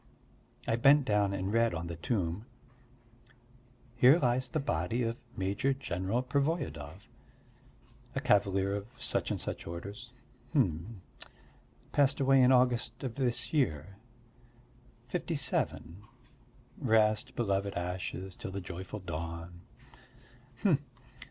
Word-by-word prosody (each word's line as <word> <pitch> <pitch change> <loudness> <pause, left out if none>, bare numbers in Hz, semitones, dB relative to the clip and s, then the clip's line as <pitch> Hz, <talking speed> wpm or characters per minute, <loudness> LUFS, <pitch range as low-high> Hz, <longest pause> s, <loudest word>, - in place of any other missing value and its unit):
I 115 - +2
bent 140 +3 +6
down 105 -3 +2
and 100 +1 -2
read 115 -3 +3
on 80 +1 -4
the 85 0 -5
tomb: 90 +2 -2 1.5
"Here 125 +5 +7
lies 125 -3 +1
the 155 - -1
body 115 - -1
of 115 +1 -3 0.2
Major 100 +8 +1
General 100 -1 -2
Pervoyedov... 130 - -2 1.1
a - - +1
cavalier 100 -1 +2
of 100 0 -5
such - - -1
and - - -1
such - - -4
orders." 100 +8 -7 0.4
Hm! 95 - 0 0.9
"Passed 140 -1 +3
away 135 -1 +5
in 125 +1 +6
August 125 -1 +2
of 130 -4 -3
this 120 -1 -1
year... 100 - 0 1.1
fifty 170 +4 -2
seven.... 100 - -1 0.8
Rest, 110 -1 +2
beloved 100 -3 0
ashes, 90 +1 -4
till - - -6
the 95 +1 -4
joyful 95 +3 -7
dawn!" 85 0 -6
105 Hz, 115 wpm, -31 LUFS, 90-125 Hz, 1.5 s, Here